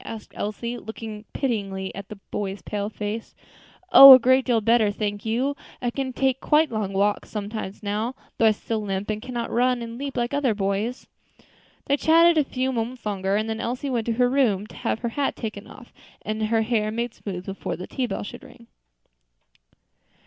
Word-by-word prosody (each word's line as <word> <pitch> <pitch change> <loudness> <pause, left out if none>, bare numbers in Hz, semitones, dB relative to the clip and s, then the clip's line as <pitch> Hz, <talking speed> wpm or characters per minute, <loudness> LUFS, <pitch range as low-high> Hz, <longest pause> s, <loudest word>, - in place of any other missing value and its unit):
asked 225 -1 -9
Elsie, 235 +3 -4
looking 220 -1 -8
pityingly 195 -7 -2
at 200 0 -8
the 215 - -7 0.2
boy's 195 -1 -4
pale 205 -1 -3
face. 215 +1 -5 0.6
"Oh! 275 0 +13
a - - +11
great 260 +1 +3
deal 240 -3 +2
better, 225 0 +3
thank 205 +1 -3
you. 255 +6 0 0.2
I 245 - -1
can 265 0 -3
take 265 0 0
quite 300 -1 +3
long 215 -3 -2
walks 205 +1 0
sometimes 210 -1 -5
now, 215 +5 -2 0.2
though 225 - +5
I - - +6
still 220 +1 -3
limp, 200 0 -3
and 215 0 -4
cannot 240 -1 -4
run 245 0 +1
and 230 +1 -7
leap 275 -1 -5
like 240 +2 -1
other 275 -6 +1
boys." 200 +5 -2 0.8
They 280 - +2
chatted 330 +2 +5
a - - +4
few 260 -1 -2
moments 240 0 -4
longer, 195 -1 -1
and 215 +1 0
then 220 0 -3
Elsie 255 +4 -3
went 235 -3 -1
to 230 - +1
her 245 +2 +3
room 245 -7 +2
to - - -14
have 230 - -2
her 235 - -1
hat 275 +4 -1
taken 215 -2 -6
off, 240 - -14 0.3
and 215 0 -2
her 225 0 +2
hair 220 -2 0
made 235 +1 -3
smooth 185 -3 -7
before 195 0 -4
the 180 - -7
tea 255 -2 -3
bell - - -4
should 205 - -9
ring. 235 - -15
225 Hz, 195 wpm, -24 LUFS, 210-250 Hz, 0.8 s, Oh